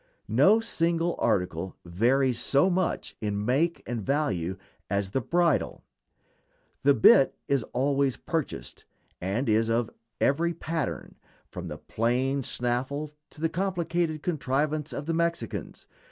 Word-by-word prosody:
No 215 +4 +5
single 170 -6 0
article 90 -1 -1
varies 120 +8 +2
so 140 +9 +3
much 185 0 -1
in 105 -1 -2
make 155 +8 +1
and 120 -2 -3
value 95 - -1 0.3
as 100 0 -1
the 135 - 0
bridle. 170 +3 +1 1.0
The 140 0 +5
bit 125 +4 +6
is 140 -2 +2
always 135 0 +1
purchased, 150 - -4 0.4
and 100 +9 -1
is 110 +1 +2
of 115 0 0 0.3
every 170 +4 +2
pattern, 160 -2 -4 0.3
from - - -6
the - - -6
plain 130 +4 0
snaffle 130 +5 -2 0.2
to - - -16
the 165 - +1
complicated 175 -4 -1
contrivance 150 -1 -1
of 145 - -5
the 165 - -1
Mexicans. 170 -8 -2
140 Hz, 125 wpm, -27 LUFS, 115-165 Hz, 1.0 s, bit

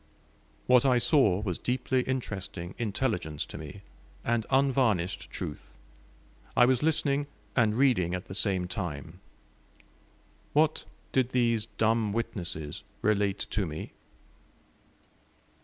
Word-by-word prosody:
What 125 -1 +6
I 130 -2 +4
saw 115 - +3
was 95 -5 -2
deeply 130 +1 0
interesting 100 -8 -4
intelligence 105 - -1
to - - -10
me, 95 +6 -9 0.4
and 115 -1 0
unvarnished 125 -10 +2
truth. - - -7 0.8
I 125 - +8
was 125 -1 +3
listening 145 -2 +2 0.3
and 110 -3 +3
reading 110 -10 +3
at 90 - -6
the - - -8
same 95 -2 0
time. 85 - -5 1.3
What 155 +1 +2 0.3
did 130 -2 +2
these 115 -3 +1
dumb 110 -1 +2
witnesses 85 -9 -3 0.2
relate 100 -2 +1
to 100 -3 0
me? 75 0 -6
110 Hz, 110 wpm, -29 LUFS, 95-130 Hz, 1.3 s, I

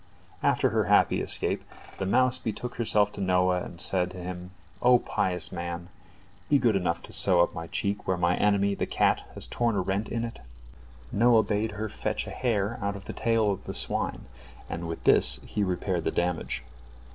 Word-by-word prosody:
After - - +2
her - - +1
happy - - +3
escape, - - 0 0.4
the 95 - -2
mouse 130 +4 +2
betook 120 +2 -5
herself 105 -3 +2
to 100 - -7
Noah 90 -1 +2
and 85 - -9
said 90 0 +2
to 90 - -10
him, 90 0 -6 0.3
"O 125 0 +6
pious 95 -7 -1
man, 85 0 -5 0.6
be 145 - +5
good 120 -6 +2
enough 85 -3 -1
to - - -6
sew 90 -3 +4
up 85 - +1
my 85 -3 -6
cheek 100 +4 -2
where 95 - +1
my 85 0 +2
enemy, 100 0 +2
the - - -2
cat, - - +2
has - - +1
torn 120 -2 0
a 95 - +1
rent 100 +3 -2
in 115 0 -2
it." 115 - -8 0.7
Noah 115 +1 +4
bade 105 +1 -1
her 110 +1 -3
fetch - - -3
a - - -7
hair 115 -3 -1
out 100 0 -2
of 100 - -10
the - - -6
tail 115 -3 +1
of 95 - -5
the - - -2
swine, - - 0 0.4
and 85 0 -5
with 80 - -6
this 65 -1 +5
he 105 - -2
repaired 90 -2 -1
the - - +1
damage. 85 -7 -2
100 Hz, 195 wpm, -27 LUFS, 90-110 Hz, 0.7 s, O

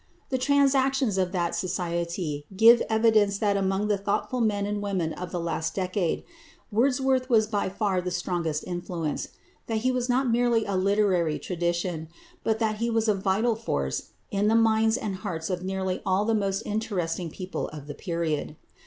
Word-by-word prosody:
The 260 - 0
Transactions 270 -4 +3
of 185 -1 +1
that 175 -3 -1
Society 170 -4 -2
give 230 +2 +8
evidence 220 -2 +3
that 205 -1 +1
among 195 +1 0
the 205 -2 +1
thoughtful 210 +5 -1
men 205 -3 +1
and 205 0 -2
women 185 -6 -1
of 180 0 -6
the 180 - -2
last 160 -1 -2
decade 185 -2 -1 0.5
Wordsworth 260 +3 +2
was 220 -3 +5
by 210 -3 -1
far 195 -1 0
the 180 - -3
strongest 175 -3 -2
influence, 175 -3 -3 0.4
that 225 - 0
he 255 - +4
was 250 0 -1
not 255 +2 +2
merely 235 -1 +2
a 200 - -2
literary 185 -4 +2
tradition, 170 -2 -2 0.4
but 220 -1 +1
that 220 -1 0
he 230 +2 -1
was 225 -1 +1
a 210 - +4
vital 200 +4 +1
force 70 - -3 0.2
in 200 +1 +1
the 220 - +4
minds 225 0 +4
and 200 -6 -3
hearts 180 -3 -4
of 180 -1 -2
nearly 190 -1 -2
all 190 +1 +1
the 225 - +2
most 200 -1 0
interesting 185 -6 -2
people 185 +3 -4
of 150 -2 -9
the 145 - -6
period. 165 -3 -2
200 Hz, 175 wpm, -26 LUFS, 175-225 Hz, 0.5 s, give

